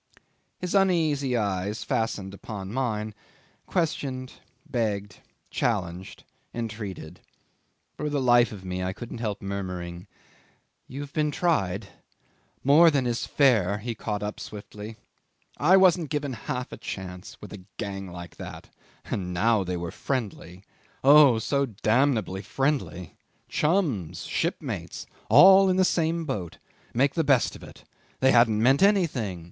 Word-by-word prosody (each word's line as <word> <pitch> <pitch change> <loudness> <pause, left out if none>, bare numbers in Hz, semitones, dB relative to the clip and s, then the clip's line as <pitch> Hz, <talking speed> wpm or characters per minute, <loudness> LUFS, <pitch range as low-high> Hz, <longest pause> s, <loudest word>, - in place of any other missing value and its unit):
'His 180 -1 -4
uneasy 160 -9 +2
eyes 100 0 -2
fastened 100 -4 -2
upon 100 0 -7
mine, 110 -4 -2 0.5
questioned, 135 -7 -2 0.3
begged, 105 -4 -2 0.3
challenged, 90 -1 -2 0.3
entreated. 105 -7 -6 0.8
For 150 - -2
the 145 -1 0
life 120 -3 +4
of 95 -3 -9
me 90 0 -3
I 95 +1 -2
couldn't 120 +2 -8
help 105 -4 -3
murmuring, 90 -2 -5 0.8
"You've 140 +1 -7
been 150 -1 +1
tried." 105 - 0 0.7
"More 155 +5 +7
than 140 -4 +1
is 120 -1 -1
fair," 110 -9 +3
he 115 +3 -4
caught 105 -1 -4
up 105 +1 -4
swiftly. 105 +1 -9 0.6
"I 180 +6 +5
wasn't 180 -5 +4
given 145 -3 -2
half 125 +2 -5
a - - -7
chance 90 -1 -7
with - - -10
a 100 - -9 0.2
gang 95 -3 -5
like 85 -1 -9
that. - - -9 0.3
And 90 -2 -3
now 110 +2 +3
they 90 -1 -3
were 85 -1 -4
friendly 100 -8 -4 0.4
oh, 140 -3 +7
so 140 +5 0
damnably 110 -2 +1
friendly! 130 - -2 0.3
Chums, 150 - 0
shipmates. - - -3 0.2
All 190 - +8
in 185 - +2
the 185 0 +4
same 165 -1 0
boat. 100 - -4 0.3
Make 135 +4 +2
the 165 - +1
best 135 -4 +2
of - - -12
it. - - -13 0.4
They 130 0 +4
hadn't 115 -3 +4
meant 135 +5 +4
anything. 155 - +2
115 Hz, 135 wpm, -26 LUFS, 100-145 Hz, 0.8 s, All